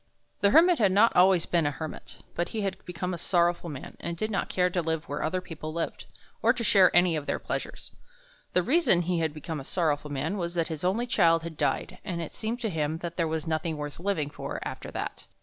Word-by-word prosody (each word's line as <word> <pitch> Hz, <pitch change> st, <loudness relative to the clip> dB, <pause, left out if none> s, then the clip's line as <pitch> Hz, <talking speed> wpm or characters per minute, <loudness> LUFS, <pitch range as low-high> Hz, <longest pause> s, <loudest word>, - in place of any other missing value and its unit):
The 200 Hz, -, +4 dB
Hermit 335 Hz, -, +6 dB
had 200 Hz, -4 st, +4 dB
not 210 Hz, +5 st, +5 dB
always 180 Hz, -1 st, +5 dB
been 170 Hz, -4 st, +1 dB
a -, -, +3 dB
Hermit, 155 Hz, +2 st, -8 dB
but 175 Hz, -, -2 dB
he 220 Hz, -, -3 dB
had 190 Hz, -1 st, -3 dB
become 180 Hz, +1 st, -3 dB
a 175 Hz, -, -4 dB
sorrowful 175 Hz, 0 st, +1 dB
man, 140 Hz, -4 st, -8 dB
and 170 Hz, 0 st, -4 dB
did 215 Hz, +5 st, -2 dB
not 200 Hz, -, -1 dB
care 180 Hz, -1 st, +2 dB
to 175 Hz, -, 0 dB
live 160 Hz, -1 st, -2 dB
where 145 Hz, -, -3 dB
other 185 Hz, +4 st, -1 dB
people 155 Hz, -3 st, -7 dB
lived, 165 Hz, 0 st, -4 dB, 0.3 s
or -, -, +5 dB
to 235 Hz, -, -4 dB
share 195 Hz, -4 st, +6 dB
any 175 Hz, -1 st, +5 dB
of 150 Hz, -2 st, -4 dB
their -, -, 0 dB
pleasures. -, -, -5 dB, 0.6 s
The 180 Hz, -, +3 dB
reason 255 Hz, -, +4 dB
he 175 Hz, 0 st, 0 dB
had 160 Hz, -2 st, 0 dB
become 155 Hz, +1 st, -5 dB
a -, -, -7 dB
sorrowful 150 Hz, -1 st, 0 dB
man 150 Hz, +8 st, -2 dB
was 170 Hz, 0 st, -3 dB
that 165 Hz, -1 st, 0 dB
his 160 Hz, 0 st, -5 dB
only 200 Hz, +7 st, +1 dB
child 165 Hz, -8 st, +3 dB
had 165 Hz, -1 st, -6 dB
died, 145 Hz, -3 st, -1 dB
and 175 Hz, -3 st, -3 dB
it 165 Hz, -, -5 dB
seemed 230 Hz, +2 st, -3 dB
to 225 Hz, -, -1 dB
him 155 Hz, -1 st, -1 dB
that 170 Hz, -1 st, -4 dB
there 165 Hz, -2 st, +1 dB
was 160 Hz, 0 st, -2 dB
nothing 160 Hz, 0 st, -1 dB
worth 145 Hz, 0 st, -6 dB
living 170 Hz, -6 st, -1 dB
for -, -, -5 dB
after -, -, -7 dB
that. -, -, -5 dB
170 Hz, 235 wpm, -28 LUFS, 160-190 Hz, 0.6 s, Hermit